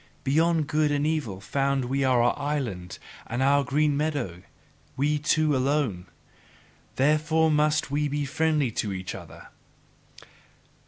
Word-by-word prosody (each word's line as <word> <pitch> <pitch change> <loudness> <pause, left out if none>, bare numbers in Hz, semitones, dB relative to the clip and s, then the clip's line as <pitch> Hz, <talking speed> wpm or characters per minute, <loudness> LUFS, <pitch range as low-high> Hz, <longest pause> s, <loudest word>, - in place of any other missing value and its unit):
Beyond 160 +3 +2
good 150 +1 +1
and 145 0 0
evil 150 -12 -2
found 135 +4 -1
we 135 +2 -1
our 120 -2 +3
island 130 -12 -4 0.3
and 120 +3 -1
our 140 +1 +4
green 145 +2 +1
meadow 140 - -2 0.6
we 150 +2 +1
two 155 0 +2
alone! 130 -9 0 0.9
Therefore 155 +3 +2
must 150 -1 +1
we 150 +1 0
be 145 0 -2
friendly 150 -2 0
to 105 -2 -2
each 95 -1 -5
other! - - -11
145 Hz, 125 wpm, -26 LUFS, 130-150 Hz, 0.9 s, our